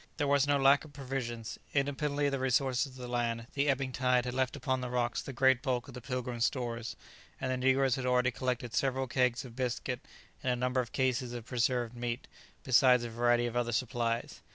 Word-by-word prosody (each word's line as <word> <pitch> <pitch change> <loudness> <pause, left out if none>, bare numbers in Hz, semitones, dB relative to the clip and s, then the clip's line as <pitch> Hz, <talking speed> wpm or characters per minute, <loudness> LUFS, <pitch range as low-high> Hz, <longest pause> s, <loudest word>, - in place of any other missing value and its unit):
There 145 - +1
was 140 0 +3
no 145 0 +3
lack 140 +1 +5
of 155 -2 -13
provisions; 125 -4 -4 0.2
independently 145 +1 0
of 140 - +2
the 135 - -1
resources 130 +1 +1
of 130 - -14
the 125 -1 -7
land, 120 -1 -1
the 145 +1 +1
ebbing 135 -1 0
tide 125 -1 +2
had 125 - -3
left 130 0 0
upon 130 -2 -1
the 125 - -3
rocks 120 -1 0
the - - -7
great 130 0 +3
bulk 125 -3 -1
of - - -10
the 125 - -8
"Pilgrim's" 125 -1 -2
stores, 120 -3 -3 0.4
and 130 -1 -2
the 130 - 0
negroes 130 +1 +3
had 130 - -3
already 125 0 +3
collected 125 -1 -2
several 135 +2 +1
kegs 125 -1 +1
of 120 -2 -11
biscuit, 125 0 -2 0.4
and 130 - 0
a - - +1
number 125 +1 +1
of 120 - -8
cases 130 -2 0
of 120 -2 -6
preserved 120 -1 0
meat, 120 +1 -3 0.4
besides 125 -1 +5
a 120 - -5
variety 120 +1 +2
of 120 0 -4
other 120 -1 0
supplies. 115 0 -1
125 Hz, 215 wpm, -31 LUFS, 120-130 Hz, 0.4 s, lack